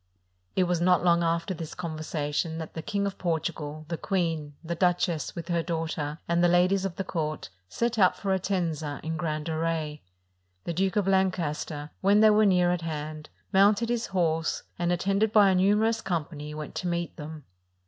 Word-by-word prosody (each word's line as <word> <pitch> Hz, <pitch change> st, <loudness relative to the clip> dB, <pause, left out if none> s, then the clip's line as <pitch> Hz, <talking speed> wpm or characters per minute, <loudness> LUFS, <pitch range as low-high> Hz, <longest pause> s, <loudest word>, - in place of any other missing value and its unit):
It 185 Hz, -, +4 dB
was 175 Hz, -1 st, 0 dB
not 180 Hz, 0 st, +4 dB
long 170 Hz, -1 st, +4 dB
after 170 Hz, +2 st, 0 dB
this 165 Hz, -2 st, -7 dB
conversation 155 Hz, -1 st, -3 dB
that 160 Hz, -1 st, -6 dB
the 160 Hz, -, -5 dB
King 200 Hz, +2 st, -1 dB
of 200 Hz, -1 st, -4 dB
Portugal, 155 Hz, -3 st, -3 dB
the 165 Hz, -1 st, -4 dB
queen, 165 Hz, -6 st, -1 dB
the 170 Hz, +1 st, -3 dB
duchess, 175 Hz, -2 st, 0 dB
with 170 Hz, -1 st, -6 dB
her 170 Hz, -1 st, +1 dB
daughter, 160 Hz, -3 st, -3 dB
and 170 Hz, +1 st, +2 dB
the -, -, +6 dB
ladies 180 Hz, +2 st, +3 dB
of 185 Hz, -3 st, -3 dB
the 195 Hz, -, -2 dB
court, 155 Hz, -4 st, -3 dB, 0.2 s
set 235 Hz, -1 st, -1 dB
out 185 Hz, -2 st, +5 dB
for 195 Hz, -, -2 dB
Entenga 170 Hz, -6 st, -1 dB
in 160 Hz, +1 st, -2 dB
grand 155 Hz, -2 st, -2 dB
array. 160 Hz, -2 st, -2 dB, 0.6 s
The 170 Hz, -, -3 dB
Duke 190 Hz, +3 st, 0 dB
of 205 Hz, -2 st, +1 dB
Lancaster, 165 Hz, -6 st, 0 dB
when 200 Hz, +2 st, +5 dB
they 215 Hz, 0 st, +7 dB
were 210 Hz, 0 st, +5 dB
near 180 Hz, -2 st, +4 dB
at 180 Hz, -1 st, -1 dB
hand, 155 Hz, -1 st, -5 dB, 0.2 s
mounted 205 Hz, +4 st, +4 dB
his 240 Hz, -1 st, -1 dB
horse; 165 Hz, -4 st, 0 dB, 0.2 s
and, 175 Hz, 0 st, +1 dB
attended 195 Hz, +4 st, +1 dB
by 205 Hz, -3 st, +6 dB
a -, -, +2 dB
numer 205 Hz, +4 st, +4 dB
ous 225 Hz, -1 st, -2 dB
company, 150 Hz, -5 st, -4 dB
went 155 Hz, 0 st, -6 dB
to 180 Hz, -, -2 dB
meet 170 Hz, -1 st, -2 dB
them. 155 Hz, -1 st, -8 dB
170 Hz, 190 wpm, -27 LUFS, 155-190 Hz, 0.6 s, they